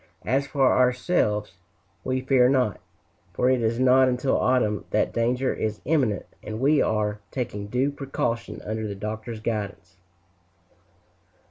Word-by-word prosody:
As 135 +4 +1
for 140 -1 +1
ourselves, 125 - +1 0.5
we 130 0 -1
fear 130 -1 +4
not, 125 -6 +1 0.5
for 125 +8 +2
it 130 -2 +2
is 115 +1 0
not 130 0 +5
until 125 +2 0
autumn 115 -5 +1
that 105 - 0
danger 125 +3 +1
is 110 -1 -3
imminent, 130 -9 +1 0.2
and 110 0 -6
we 145 +3 +3
are 105 -1 0
taking 105 -6 -4
due 125 +6 0
precaution 135 -4 -3
under 110 0 -3
the 100 - -5
Doctor's 110 +2 -6
guidance. 105 -4 -4
125 Hz, 135 wpm, -25 LUFS, 105-130 Hz, 0.5 s, not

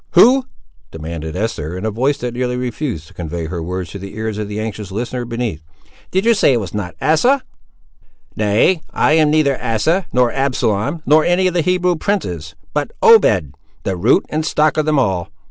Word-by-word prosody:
"Who?" 250 +8 +6 0.4
demanded 80 0 -6
Esther, 90 -5 -3
in 95 - -5
a 110 - 0
voice 130 +7 0
that 120 -1 -4
nearly 125 0 -2
refused 125 - -4
to - - -18
convey 85 -1 -5
her 85 +1 -4
words 90 0 -4
to 100 - -7
the 100 +1 -9
ears 110 -1 -3
of 105 - -3
the 105 +1 -5
anxious 105 -2 -5
listener 120 +4 -3
beneath. 115 -8 -3 0.5
"Did 190 +3 0
you 235 - +5
say 195 -10 +3
it 120 - +2
was 95 -5 -6
not 95 -5 -4
Asa?" 200 - +3 0.9
"Nay, 110 - +2
I - - +1
am 155 -1 +4
neither 150 -3 +2
Asa, 140 - +1
nor 125 -1 +2
Absalom, 130 +1 -1
nor 155 +2 +5
any 175 +3 +2
of 185 - +2
the 175 - +2
Hebrew 180 +1 +1
princes, 90 - -3 0.2
but 145 -1 -1
Obed, 95 - +5 0.3
the 95 - -1
root 85 - +3
and 155 +1 -1
stock 155 -1 +2
of 155 0 +1
them 155 -1 +2
all. 95 -9 0
120 Hz, 195 wpm, -18 LUFS, 95-155 Hz, 0.9 s, Who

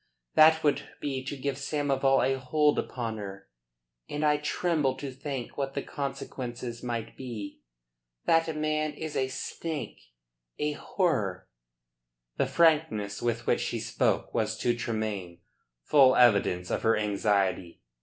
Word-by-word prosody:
That 160 +1 +6
would 145 -2 +1
be 135 -2 -3
to 140 +1 -4
give 135 0 -2
Samoval 140 -2 +1
a 135 0 0
hold 150 +3 +2
upon 115 -3 -3
her; 95 -4 -8 0.6
and 150 +1 -1
I 150 0 +4
tremble 150 -2 0
to 140 -1 -6
think 135 -1 -5
what 135 -1 -2
the 140 - -2
consequences 125 -4 -5
might 115 -2 -4
be. 115 -6 -7 0.6
That 165 -1 +2
man 155 0 0
is 160 -2 -6
a 130 - +1
snake 150 +4 -5 0.6
a 150 0 0
horror." 125 - -1 0.9
The - - +2
frankness 155 -11 +2
with 120 0 -1
which - - +2
she - - -2
spoke - - 0
was - - 0
to 120 -1 +2
Tremayne 110 -7 -3 0.5
full 130 - +6
evidence 100 -7 +4
of - - 0
her 115 - +3
anxiety. 100 -4 0
130 Hz, 135 wpm, -28 LUFS, 110-150 Hz, 0.9 s, That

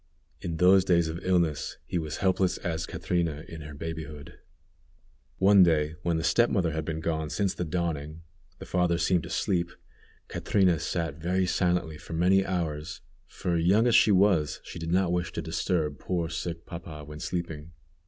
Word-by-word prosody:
In 85 -2 -3
those 95 +2 +6
days 85 -3 +3
of 85 +3 -6
illness 85 -5 0
he 90 - -2
was 80 -2 -4
helpless 95 -1 +2
as 80 -1 -3
Catrina 85 -3 -2
in 80 -2 -8
her 75 -1 -9
babyhood. 80 -2 -7 1.0
One 100 +1 +6
day, 80 -3 +3
when 85 -1 0
the 80 - -2
step 120 +6 +3
mother 85 -5 +1
had 80 0 -3
been 80 0 -3
gone 80 -1 -2
since 95 +5 0
the - - -3
dawning, 80 -1 -3 0.3
the - - -9
father 90 -2 +1
seemed 90 0 +2
to - - -9
sleep, 85 -3 0 0.6
Catrina 90 -5 +2
sat 80 -3 -2
very 90 +3 +1
silently 90 -4 0
for - - -9
many 90 +4 +3
hours, 85 -2 -3 0.3
for 85 -2 -2
young 95 +7 +4
as 120 - +3
she 115 - +6
was, 95 -6 +3
she - - -8
did 80 0 -4
not 90 -1 +2
wish 90 -1 -1
to - - -3
disturb 75 -5 -1
poor 85 -3 -2
sick 85 0 -5
papa 85 -3 -8
when 75 +1 -9
sleeping. 85 -1 -5
85 Hz, 175 wpm, -28 LUFS, 80-90 Hz, 1.0 s, those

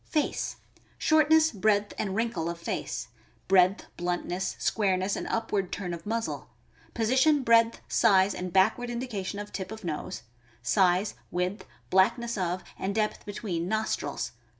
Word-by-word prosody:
Face.— 305 -3 -1 0.4
Shortness, 315 0 +4
breadth, 205 0 +1
and 195 -3 -2
wrinkle 210 -8 -1
of 170 - -4
face; 170 - -4 0.4
breadth, 185 0 +4
bluntness, 180 +1 -2
squareness, 190 -2 +1
and - - -4
upward 205 -5 -1
turn 180 -3 -3
of 170 +2 -8
muzzle; 225 +1 -3 0.5
position, 260 +6 +3
breadth, 230 -1 +4
size, 195 -3 +4
and 180 0 -5
backward 195 +7 +3
indication 230 -6 -4
of 205 0 -6
tip 190 0 -5
of 220 -1 -8
nose; 170 +2 -4 0.4
size, 185 - +3 0.2
width, 180 +3 -2 0.2
blackness 230 +5 +3
of, 180 -2 -2 0.2
and 195 +1 -2
depth 215 -1 -1
between, 185 -5 -3
nostrils. 220 +2 -2
200 Hz, 135 wpm, -28 LUFS, 185-230 Hz, 0.5 s, Shortness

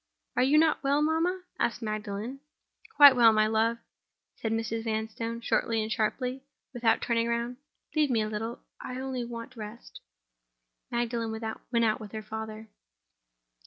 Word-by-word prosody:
"Are - - +3
you 275 +4 +4
not 315 0 +4
well, 285 +2 +3
mamma?" 335 +4 +1 0.2
asked 235 0 0
Magdalen. 215 +4 -4 0.6
"Quite 285 -2 +10
well, 235 -2 +7
my 215 0 +4
love," 225 +2 +2 0.6
said 220 - -3
Mrs. 225 0 -1
Vanstone, 225 +1 -3
shortly 230 0 +1
and 215 - -5
sharply, 250 +5 -1 0.3
without 235 -2 +2
turning 230 -1 +1
round. 235 +1 -1 0.4
"Leave 305 -2 +3
me 230 -4 +2
a - - -2
little—I 225 +3 -6
only 260 -2 -3
want 235 +2 -7
rest." 220 +1 -9 0.9
Magdalen 235 -1 -1
went 220 +1 -5 0.4
out 215 -1 +1
with 210 -1 -10
her 215 0 -5
father. 220 0 -6
230 Hz, 145 wpm, -29 LUFS, 220-250 Hz, 0.9 s, Quite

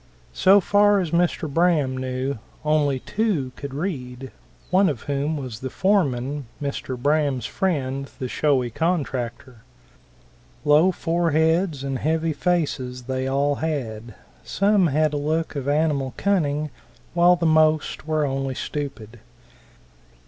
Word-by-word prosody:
So 195 +2 +6
far 205 +1 +4
as 175 -4 -2
Mr. 170 -1 +1
Braham 155 -4 +2
knew, 130 0 -3 0.3
only 150 -3 +2
two 200 - -1
could 140 -1 -7
read, 135 -6 -5 0.4
one 190 +1 +4
of 135 -7 -4
whom 145 +2 -1
was 125 -6 -6
the 130 - -5
foreman, 145 - 0
Mr. 140 -2 -4
Braham's 140 -2 +1
friend, 140 -8 -2
the 130 - -3
showy 130 -3 +1
contractor. 130 -6 -2 1.1
Low 150 +5 +5
foreheads 165 -2 +1
and 135 -2 -2
heavy 160 +2 0
faces 140 -8 -1
they 130 +1 -2
all 140 +1 +1
had; 120 -8 -4 0.3
some 200 -2 +2
had 155 +1 +1
a - - 0
look 155 +2 -1
of 140 -1 -4
animal 145 -3 0
cunning, 155 -7 0 0.4
while 175 +1 +5
the 170 -1 -2
most 155 -1 +2
were 155 -1 +1
only 135 -1 -2
stupid. 125 -7 -5
145 Hz, 125 wpm, -23 LUFS, 130-165 Hz, 1.1 s, So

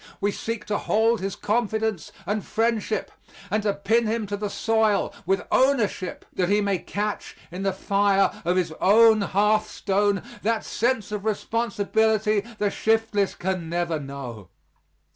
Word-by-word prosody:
We 205 +1 +1
seek 230 +2 -4
to 210 - -1
hold 225 0 +2
his 195 0 -3
confidence 220 -4 -1
and 205 +2 -1
friendship 225 -1 -1 0.4
and 215 +1 +1
to 205 -1 +1
pin 225 +3 +1
him 220 0 -1
to 205 0 -3
the 205 0 -3
soil 220 -1 +1
with 195 +1 +1
ownership, 240 -8 +1
that 180 -1 0
he 205 +1 +3
may 200 -3 0
catch 205 +3 -4
in 180 +2 -6
the 195 0 +1
fire 195 0 +2
of 175 +2 +1
his 170 -3 0
own 220 +2 +6
hearthstone 205 0 +1 0.2
that 225 +1 0
sense 230 -2 -1
of 210 -1 -3
responsibility 220 -1 +1 0.2
the 205 -1 0
shiftless 220 -3 +1
can 180 -2 -3
never 170 -2 -1
know. 135 - -8
205 Hz, 145 wpm, -24 LUFS, 195-220 Hz, 0.4 s, own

